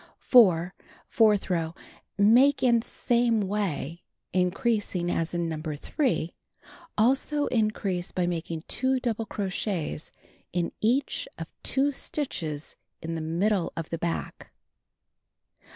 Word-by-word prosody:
4. 185 -8 +5 0.3
Fourth 215 -3 +3
row: 165 -2 -1 0.4
Make 245 +8 +5
in 235 -2 +4
same 235 -1 +1
way, 185 -5 -2 0.3
increasing 185 -1 0
as 165 +1 -1
in 170 -1 0
No. 160 -1 -4
3. 165 - -1 0.6
Also 270 +6 +2
increase 215 -6 -1
by 180 - 0
making 165 -2 -3
2 260 0 +1
double 225 -3 -2
crochets 190 -5 -3 0.4
in 175 -1 -1
each 260 - +1
of - - -5 0.2
2 280 +2 +1
stitches 160 - -4 0.3
in 165 +1 -3
the 165 - -3
middle 175 +4 0
of 165 -1 -5
the 165 - -2
back. 170 0 -4
195 Hz, 115 wpm, -27 LUFS, 170-235 Hz, 0.6 s, 4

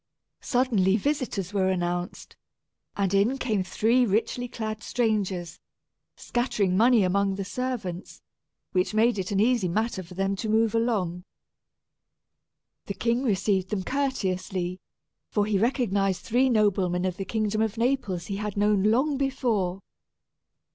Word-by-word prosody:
Suddenly 220 -7 +2
visitors 220 - -2
were 190 -2 +2
announced, 175 -1 -3 0.6
and 200 -1 0
in 210 +7 +3
came 220 -7 0
three 230 +7 +2
richly 235 +3 0
clad 215 -2 -5
strangers, 200 -9 -1 0.6
scattering 215 -6 -1
money 230 +1 +5
among 195 +1 +1
the 195 0 -4
servants, 215 -7 -5 0.5
which 185 +3 0
made 225 0 +3
it 185 - -3
an 200 - 0
easy 230 -3 +3
matter 215 +3 -1
for 180 0 -12
them 195 +1 0
to 220 - -3
move 220 0 +2
along. 200 -7 0 1.6
The 200 - -4
king 235 +1 0
received 195 -5 0
them 205 -3 -2
courteously, 185 -9 -2 0.5
for 205 -1 +1
he 205 -2 +1
recognized 200 -5 +1
three 255 +3 +2
noblemen 190 -5 +2
of 185 -1 -2
the 195 - -3
kingdom 215 +1 -1
of 220 0 -1
Naples 230 -8 0
he 195 - -4
had 210 -1 -4
known 205 -1 +3
long 255 +8 +2
before. 230 -9 0
205 Hz, 135 wpm, -26 LUFS, 190-235 Hz, 1.6 s, money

